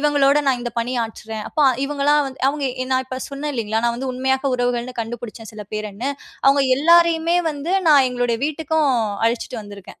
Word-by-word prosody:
இவங்களோட 285 -1 +3
நான் 260 -2 +2
இந்த 240 - -4
பணியாற்றுறேன். 225 -2 -3
அப்ப 305 - -2 0.2
இவங்கள்லாம் 290 +1 +2
வந்து 265 0 -9
அவங்க 285 0 -2 0.2
எ - - -9
நான் 260 0 +1
இப்ப 260 0 -5
சொன்னேன் 290 +1 -4
இல்லைங்களா? 220 -1 -1
நான் 235 - +1
வந்து 260 +1 -3
உண்மையாக 265 +1 0
உறவுகள்ன்னு 245 0 -2
கண்டுபுடிச்சேன் 225 -1 -7
சில 210 -1 -8
பேருன்னு. 215 +5 -3 0.4
அவங்க 275 0 +5 0.2
எல்லாரையுமே 335 +1 +4
வந்து 300 +4 -4 0.2
நான் 280 -4 +6
எங்களுடைய 245 -2 -1
வீட்டுக்கும் 310 -1 0 0.4
அழைச்சிட்டு 235 0 -2
வந்துருக்கேன். 205 -2 -12
260 Hz, 170 wpm, -21 LUFS, 235-290 Hz, 0.4 s, நான்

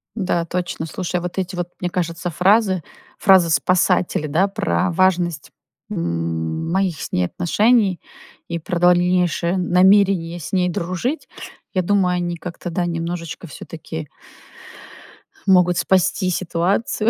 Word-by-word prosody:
Да, 180 -5 -1
точно. 175 -2 -3
Слушай, 180 +2 -3
вот 180 +2 -6
эти 185 0 -2
вот, 175 0 -3
мне 180 - -1
кажется, 175 -1 -3
фразы, 190 +1 +2 0.3
фразы-спасатели, 180 -3 +3
да, 170 +7 +2
про 195 -2 0
важность, 175 -3 +1 0.4
м, 85 - -2
моих 190 -4 0
с - - -6
ней 90 - +1
отношений 200 - +2 0.5
и 170 - -3
про 170 +2 -3
дальнейшее 180 0 +2
намерение 180 -1 +3
с 160 - -8
ней 180 -1 +2
дружить. 185 - -3 0.5
Я 185 - +1
думаю, 185 -1 +2
они 175 -1 -2
как-то, 175 +1 -7
да, 175 +1 -1
немножечко 170 0 -4
всё-таки 160 0 -8 1.4
могут 180 -2 +4
спасти 185 +2 +2
ситуацию, 185 +5 0
180 Hz, 125 wpm, -20 LUFS, 170-185 Hz, 1.4 s, могут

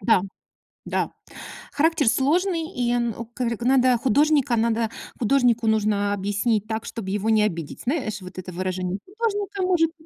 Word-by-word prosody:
Да. 190 -1 +3 0.6
Да. - - -1 0.6
Характер 315 -2 +2
сложный, 330 - +1
и, 245 -1 +1 0.2
у 230 - -5
к 235 +2 -20 0.2
надо, 255 -1 +4
художника 275 +1 +3
надо 225 0 +1 0.3
художнику 245 -1 +2
нужно 210 -2 +2
объяснить 205 +2 0
так, 220 0 -3
чтоб 225 -5 -6
его 205 +3 -1
не 215 -1 +4
обидеть. 170 -7 -3
Знаешь 245 -7 -2
вот 185 0 -11
это 185 0 -6
выражение: 185 +1 -2 0.2
художника 410 -3 -2
может 345 -3 +2
230 Hz, 145 wpm, -24 LUFS, 205-285 Hz, 0.6 s, надо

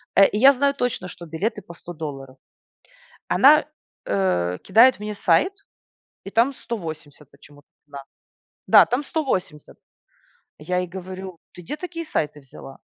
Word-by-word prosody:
Э, 195 - +7
и - - -4
я 270 +3 +8
знаю 280 +2 +1
точно, 245 -9 -3
что 175 -1 -11
билеты 195 +7 -3
по 175 -2 -13
100 175 +1 -11
долларов. 135 -5 -8 0.9
Она, - - +5 0.4
э, 90 -2 0
кидает 245 +1 +5
мне 210 0 -5
сайт 200 - +2 0.8
и - - -6
там 235 +6 +2
180 155 - -8
почему-то 145 0 -20 0.2
цена. 140 -1 -10 0.6
Да, - - +7
там 255 +4 -2
180. 190 - -4 0.8
Я 180 +4 -2
ей 180 - -3
говорю: 185 0 -8 0.2
"Ты 180 - -11
где 175 - -6
такие 340 0 -6
сайты 150 - -3
взяла?" 135 0 -13
180 Hz, 145 wpm, -22 LUFS, 150-230 Hz, 0.9 s, я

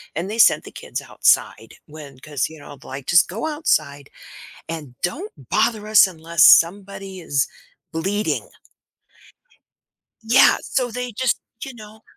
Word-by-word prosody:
and 175 +5 -3
they 220 - -5
sent - - +5
the - - -11
kids - - -5
outside - - 0
when 145 -4 -12
'cause, 145 0 -3
you 160 -1 -13
know, 145 -1 -12
like 135 0 -9
"Just 170 -2 +5
go 225 - -4
outside, 145 - -1 0.6
and 150 -6 -7
don't 365 - -4 0.2
bother 215 -2 0
us 215 -2 +7
unless 170 -2 +1
somebody 195 +1 +3
is 145 -5 -1 0.4
bleeding." 195 +6 -2 1.7
Yeah, 230 +3 +5
so 250 -2 -2
they 250 0 -5
just 255 +3 -1 0.2
you 265 -2 -9
know, 215 -1 -14
190 Hz, 140 wpm, -21 LUFS, 155-220 Hz, 1.7 s, us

